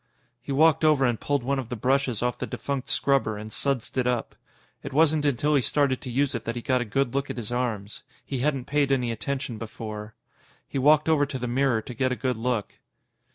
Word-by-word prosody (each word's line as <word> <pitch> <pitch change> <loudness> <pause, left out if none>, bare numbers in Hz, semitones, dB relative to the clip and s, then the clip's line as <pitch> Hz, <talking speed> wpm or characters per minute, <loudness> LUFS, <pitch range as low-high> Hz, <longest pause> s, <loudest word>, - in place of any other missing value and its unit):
He 135 - -6
walked 155 +2 +4
over 150 -4 +4
and 120 -3 +1
pulled 145 -3 0
one 135 +2 0
of 125 -3 -6
the 125 - -3
brushes 125 0 +1
off 125 0 -1
the - - -3
defunct 140 -2 -4
scrubber 135 -7 +1
and 110 +1 -8
sudsed 135 +1 -1
it 125 - +1
up. 125 -2 -1 0.5
It 140 - -7
wasn't 155 0 +3
until 145 +2 +2
he 140 - +4
started 135 +2 +1
to 130 - -6
use 135 +3 +1
it 115 -3 -3
that 115 - -3
he 120 - -4
got 130 -2 +2
a - - -2
good 125 +3 0
look 140 0 -1
at - - -5
his 115 -1 -5
arms. 115 -5 -2 0.2
He 135 - -3
hadn't 135 -1 0
paid 145 -1 +1
any 125 -3 +1
attention 120 +1 -3
before. 110 -1 -7 0.5
He 135 - -3
walked 150 +3 +5
over 150 -3 +3
to 135 - -4
the 125 -1 -3
mirror 120 -2 +1
to 125 - -7
get 130 +1 0
a - - 0
good 130 -1 -1
look. 115 -2 -2
130 Hz, 230 wpm, -26 LUFS, 120-140 Hz, 0.5 s, walked